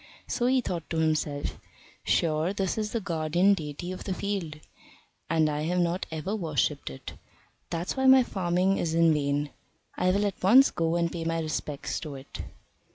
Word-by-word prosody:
So 245 - 0
he 260 0 +3
thought 175 -8 -4
to 165 - -2
himself, 155 -2 -1 0.4
"Sure 160 +3 +1
this 195 -2 -1
is 215 -1 -2
the 230 - -1
guardian 175 +1 +2
deity 160 0 -5
of 185 - -6
the 190 - -2
field, 180 -7 -3 0.7
and 160 -1 +3
I 150 0 -1
have 175 +2 0
not 175 +1 0
ever 165 +6 -3
worshipped 145 - -1
it. 65 - -9 0.6
That's 170 +2 -3
why 265 -1 +2
my 260 -1 +8
farming 185 -2 0
is 165 -1 -1
in 165 -1 +5
vain. 145 0 -1 0.4
I 180 - +1
will 200 +3 +2
at 200 -3 -3
once 250 +9 +7
go 165 0 0
and 170 -1 +1
pay 170 -2 -4
my 165 0 -1
respects 155 -2 -3
to 150 -4 -7
it." 135 +1 -8
170 Hz, 180 wpm, -28 LUFS, 155-195 Hz, 0.7 s, my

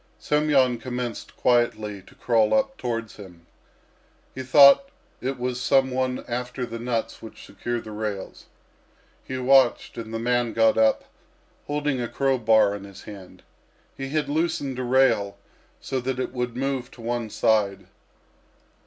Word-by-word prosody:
Semyon 140 -5 +2
commenced 125 -1 -5
quietly 110 -5 +1
to 95 - -20
crawl 115 -3 +2
up 270 0 +1
towards 115 - -4
him. 90 -5 -13 0.9
He 130 - -6
thought 140 - +6 0.3
it 130 +2 -3
was 125 0 -3
some 135 -1 +3
one 130 0 -2
after 125 +1 -4
the 115 -1 -7
nuts 115 -1 -3
which 110 - -11
secure 120 0 -4
the 110 - -10
rails. 105 -2 -6 0.8
He 130 - -5
watched, 130 -2 +3
and 110 -1 -7
the 115 - -3
man 120 0 0
got 115 0 +3
up, 110 0 +3 0.6
holding 145 -3 -1
a 120 - -2
crow 135 +1 0
bar 110 -3 +4
in 100 -1 -7
his 100 -1 -12
hand. 100 -3 -12 0.5
He 135 0 -6
had 150 +1 -1
loosened 145 -4 -1
a - - -2
rail, 125 -6 +2 0.4
so 135 - -3
that 130 +1 -3
it 130 - -3
would 125 -1 -3
move 135 -2 -2
to 120 - -15
one 120 -1 -3
side. 100 -3 +1
120 Hz, 155 wpm, -24 LUFS, 110-130 Hz, 0.9 s, thought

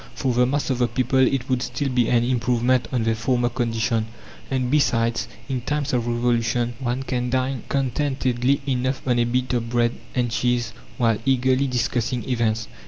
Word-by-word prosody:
For 130 -2 0
the 125 +1 +3
mass 140 +1 -1
of 130 - -1
the 120 - +3
people 130 +3 0
it 130 -1 +2
would 130 -2 0
still 125 +3 -2
be 125 -2 +1
an 120 -1 +3
improvement 125 0 +1
on 125 -3 0
their 115 0 +2
former 120 +2 0
condition; 115 -2 -1 0.4
and, 130 -2 -1
besides, 115 -6 +2 0.2
in 130 -3 -2
times 145 +2 -2
of 120 -1 0
Revolution 120 0 0
one 125 +1 -2
can 125 -2 -2
dine 130 0 -1
contentedly 135 -1 0
enough 130 0 -1
on 120 -1 +2
a 120 - +3
bit 125 +1 -1
of 115 -1 -1
bread 120 -1 +2 0.2
and 120 -2 0
cheese 120 +1 0 0.2
while 115 -4 +2
eagerly 130 +1 +2
discussing 120 -2 -1
events. 115 -3 0
125 Hz, 175 wpm, -23 LUFS, 120-130 Hz, 0.4 s, the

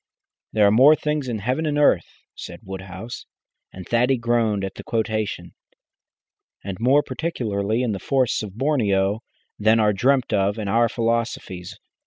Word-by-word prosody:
"There 105 -1 +3
are 100 - +5
more 135 +8 +7
things 150 -3 -2
in 120 -3 -2
heaven 130 +10 -1
and 145 -1 -1
earth," 140 - +3 0.3
said - - -9
Woodhouse 95 +4 -8 0.4
and 95 -1 -10
Thaddy 125 +3 +2
groaned 115 -4 +1
at 95 - -6
the - - -10
quotation 110 -2 -2 1.1
"and 95 -1 -5
more 135 +5 +4
particularly 120 -7 -2
in 120 - 0
the 100 - -3
forests 130 +3 0
of 105 -1 -8
Borneo, 105 -8 +1 0.4
than 110 +2 +4
are 105 -1 +3
dreamt 130 +4 +1
of 100 +1 +1
in 105 -2 -4
our 115 +3 +3
philosophies. 115 -6 -3
115 Hz, 155 wpm, -22 LUFS, 100-125 Hz, 1.1 s, more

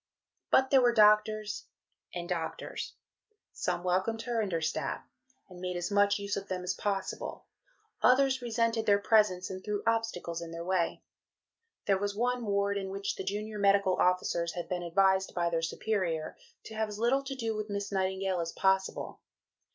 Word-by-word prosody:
But 265 0 +4
there 270 -2 +6
were 240 -1 +3
doctors 210 0 +3 0.4
and 175 -1 -5
doctors. 170 -3 -4 0.6
Some 175 - -2
welcomed 190 +5 0
her 240 -2 0
and 205 -3 -2
her 165 - 0
staff, 160 - -2 0.4
and 180 -2 -12
made 180 -1 -3
as 175 +3 -3
much 205 0 +4
use 200 0 -3
of 200 0 -5
them 185 -1 -3
as 180 +1 -1
possible. 195 -1 -3 0.6
Others 265 +1 +4
resented 230 -1 0
their 200 -1 +6
presence, 200 -4 +2
and 185 0 -7
threw 210 -1 -2
obstacles 225 -7 -1
in 170 - -6
their 165 +1 -6
way. 180 -2 0 0.8
There 195 -1 +2
was 205 0 -2
one 245 +1 0
ward 200 0 +1
in 190 -1 -5
which 195 +1 -3
the - - -5
junior 210 +2 -4
medical 200 -2 +4
officers 175 -2 +1
had 175 - -5
been 180 -1 -2
advised 190 +2 +2
by 170 -1 +1
their 165 -1 0
superior 165 -2 -2 0.3
to 220 - -10
have 220 0 -1
as 205 - -6
little 240 +5 +2
to 270 0 -5
do 225 -4 -2
with 215 0 -4
Miss 200 0 -3
Nightingale 190 -1 0
as 165 0 -3
possible. 190 0 0
200 Hz, 175 wpm, -30 LUFS, 180-220 Hz, 0.8 s, there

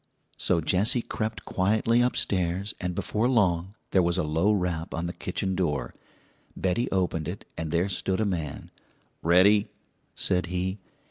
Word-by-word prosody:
So 85 -2 +1
Jessie 100 +9 +2
crept 110 0 -4
quietly 110 +5 +2
upstairs, 95 -5 0
and 90 -1 -2
before 110 +7 0
long 95 -5 +2 0.2
there 95 - +4
was 85 0 +1
a 90 - +1
low 80 +7 +2
rap 90 -5 -1
on 85 +1 -2
the 85 - -3
kitchen 95 -1 -2
door. 85 -6 -1 0.6
Betty 95 +7 0
opened 85 -5 0
it, 90 +3 -6
and 80 -1 -4
there 85 +4 +1
stood 95 0 -1
a 110 - +2
man. 85 -7 -4 0.5
"Ready?" 100 +5 +5 0.5
said 90 -1 +1
he. 90 +3 -2
90 Hz, 150 wpm, -27 LUFS, 85-100 Hz, 0.6 s, Ready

